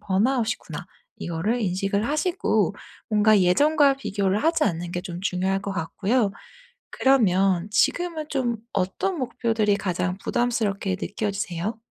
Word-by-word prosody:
번아웃이구나.' 225 +4 -1 0.3
이거를 185 +9 -1
인식을 195 +2 0
하시고 335 +5 +1 0.3
뭔가 215 -1 +4
예전과 285 - +4
비교를 200 -5 -1
하지 330 +1 +2
않는 170 -3 -2
게 175 - -2
좀 175 -1 -7
중요할 190 0 0
것 200 0 -4
같고요. 200 +6 0 0.6
그러면 195 -8 +3
지금은 325 +8 +1
좀 245 -4 -1 0.2
어떤 200 - -1
목표들이 225 -5 0
가장 180 -1 -2
부담스럽게 210 -6 -1
느껴지세요? 200 0 -3
205 Hz, 305 characters per minute, -24 LUFS, 190-245 Hz, 0.6 s, 뭔가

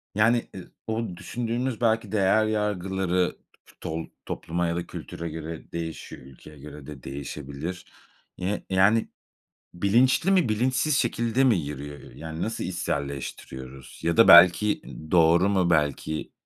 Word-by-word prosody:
yani, 115 +3 +3
ı 95 - -10 0.2
o 110 +1 -2
düşündüğümüz 120 +1 -3
belki 110 -2 +1
değer 110 +1 +3
yargıları, 95 -4 -1 0.3
t - - -20
tol 80 +1 -4 0.2
topluma 85 +1 -2
ya 85 - -1
da 85 - -4
kültüre 85 0 -7
göre 80 0 -8
değişiyor, 80 -5 -6
ülkeye 70 +3 -14
göre 75 0 -11
de 70 -4 -10
değişebilir. 70 +5 -6 0.5
Yi 95 +3 -2
yani 100 +4 +3 0.6
bilinçli 120 - +3
mi 180 - +3
bilinçsiz 130 +6 +1
şekilde 120 +1 +1
mi 120 -6 +4
yürüyor? 75 -1 -6
Ö - - -14
yani 80 +1 -6
nasıl 110 +1 -3
içselleştiriyoruz 70 -5 -5
ya 85 +5 0
da 115 - +7
belki, 90 +5 +7
ııı, 80 0 -10
doğru 85 +2 +5
mu, 95 -3 +2
belki 75 -1 0
90 Hz, 140 wpm, -26 LUFS, 80-110 Hz, 0.6 s, da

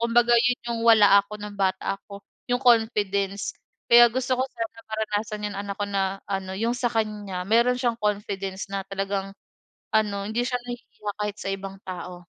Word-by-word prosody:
Kumbaga 235 +1 +3
yun 245 +1 +2
yung 230 - -2
wala 210 -3 +8
ako 210 - -8
nung 205 -1 -8
bata 195 0 0
ako, 200 -1 -11 0.3
yung 245 +2 0
confidence. 205 -4 +2 0.4
Kaya 240 0 +10
gusto 255 +1 0
ko - - +3
sana 230 -1 -6
maranasan, 215 -1 -3
yung 200 - -7
anak 200 0 -4
ko 205 - -1
na 195 0 -1
ano 195 -1 -2
yung 230 +3 0
sa 250 - 0
kanya 210 -4 -2
meron 235 +3 +4
siyang 240 -2 0
confidence 200 -2 -2
na 195 -1 -2
talagang 195 0 -3 0.6
ano, 205 -2 +1
hindi 235 +2 0
siya 250 -1 -1
nahihiya 240 -4 -7
kahit 210 0 -2
sa - - -4
ibang 195 0 -5
tao 180 -1 -6
210 Hz, 175 wpm, -25 LUFS, 195-230 Hz, 0.6 s, Kaya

